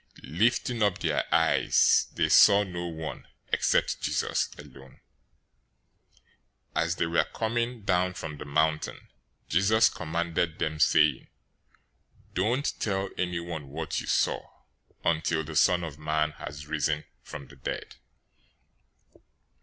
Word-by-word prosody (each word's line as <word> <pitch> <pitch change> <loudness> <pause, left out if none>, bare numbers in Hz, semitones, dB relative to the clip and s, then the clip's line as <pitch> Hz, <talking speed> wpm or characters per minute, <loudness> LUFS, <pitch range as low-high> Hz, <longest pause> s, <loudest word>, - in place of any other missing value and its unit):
017:008 75 +6 -8
Lifting 120 +1 +2
up 100 -3 +2
their - - 0
eyes, - - +4
they - - +2
saw 100 0 +7
no 90 -3 -5
one, 80 -1 -7 0.3
except - - +1
Jesus - - 0
alone. 65 -1 -14 1.8
017:009 80 - +3
As 85 +2 -1
they 85 - 0
were 85 0 +1
coming 115 0 -2
down 90 -2 +1
from 75 -4 -7
the - - -7
mountain, 75 +2 -1 0.4
Jesus 110 +6 +4
commanded 85 0 -2
them, 75 0 -2
saying, 75 - +3 1.1
"Don't 120 +9 0
tell 95 -2 -1
anyone 85 -4 -3
what 80 +3 -3
you - - -9
saw, - - +1 0.6
until 80 -1 +1
the 80 0 -8
Son 90 +3 +4
of 75 -3 -7
Man 75 0 0
has 75 0 -8
risen 75 0 -1 0.2
from 70 -2 -9
the 70 - -16
dead." 65 - -6
85 Hz, 125 wpm, -28 LUFS, 75-95 Hz, 1.8 s, saw